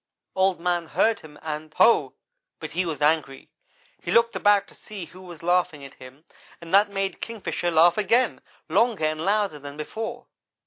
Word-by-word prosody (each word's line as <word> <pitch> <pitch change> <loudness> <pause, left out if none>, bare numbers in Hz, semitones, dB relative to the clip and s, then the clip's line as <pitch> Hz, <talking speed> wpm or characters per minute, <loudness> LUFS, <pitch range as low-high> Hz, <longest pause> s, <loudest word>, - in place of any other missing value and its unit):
"Old 190 -1 +2
man 175 -1 -1
heard 225 +6 +1
him 150 -1 -14
and 155 0 -5
Ho! 235 - +4 0.4
but - - -7
he 185 -1 -1
was 150 -2 -3
angry. 150 -3 0 0.5
He - - -7
looked 230 0 +3
about 205 -1 +3
to - - -15
see 200 -5 -9
who 180 +3 -15
was 175 -2 -11
laughing 175 -4 0
at 135 - -12
him 130 +5 -15 0.3
and 170 +1 -11
that 205 +1 +5
made 195 -1 -3
Kingfisher 215 -5 -3
laugh 170 +3 +4
again, 235 +5 +2 0.3
longer 225 -9 +2
and 155 0 -1
louder 200 -5 0
than 145 +1 -9
before. 225 +10 -6
175 Hz, 175 wpm, -24 LUFS, 155-205 Hz, 0.5 s, that